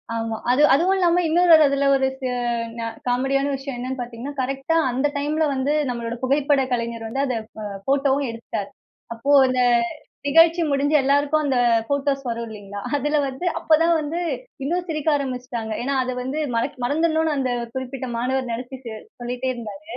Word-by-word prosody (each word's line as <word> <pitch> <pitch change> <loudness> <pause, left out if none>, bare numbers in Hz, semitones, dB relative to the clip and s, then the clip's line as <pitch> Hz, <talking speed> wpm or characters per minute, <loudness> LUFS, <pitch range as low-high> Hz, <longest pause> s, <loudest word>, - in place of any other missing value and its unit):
ஆமா. 225 0 -2 0.2
அது, 255 +4 +3
அதுவும் 350 +7 +3
இல்லாம 355 -1 +3
இன்னொரு 345 +2 +4
ஒரு 315 - +6
அதில 280 0 +1
ஒரு 265 0 +2
செ 260 - -3 0.6
அ - - -2 0.2
காமெடியான 270 +3 +1
விஷயம் 270 -1 -6
என்னன்னு 255 +2 -4
பார்த்தீங்கன்னா, 245 +3 -6
கரெக்டா 270 +4 -1 0.2
அந்த 265 +4 +1
டைம்ல 300 +2 0
வந்து 265 +2 0 0.2
நம்மளோட 235 -1 -3
புகைப்பட 280 +1 +2
கலைஞர் 235 -1 -3
வந்து, 270 +5 -2
அத 255 - -1 0.3
அ - - -5 0.2
ஃபோட்டோவும் 275 0 +2
எடுத்துட்டார். 230 -3 -5 0.4
அப்போ 230 +5 -2 0.2
அந்த 255 0 0 0.7
நிகழ்ச்சி 330 +3 +5
முடிஞ்சு 285 +2 +2
எல்லாருக்கும் 285 +3 +2
அந்த 270 -3 +1 0.3
ஃபோட்டோஸ் 280 -1 0
வரும் 235 0 -3
இல்லீங்களா, 205 -2 -8 0.2
அதில 295 +2 0
வந்து 265 +6 -6
அப்ப - - -18
தான் 335 +1 +4
வந்து 310 +3 -3 0.4
இன்னும் 350 +5 -1
சிரிக்க 310 -1 -1
ஆரம்பிச்சுட்டாங்க. 250 -5 -4
ஏன்னா, 275 +2 -1
அத 255 - -3
வந்து 270 +4 -3 0.2
மறக் 235 +5 -1
மறந்துடணுனு 315 +2 +1
அந்த 260 -2 0 0.2
குறிப்பிட்ட 260 0 -4
மாணவர் 255 +1 -1
நினச்சிட்டு 250 0 -7 0.3
சொல்லிட்டே 250 +2 -2
இருந்தாரு. 235 +4 -8
270 Hz, 160 wpm, -22 LUFS, 245-290 Hz, 0.7 s, ஒரு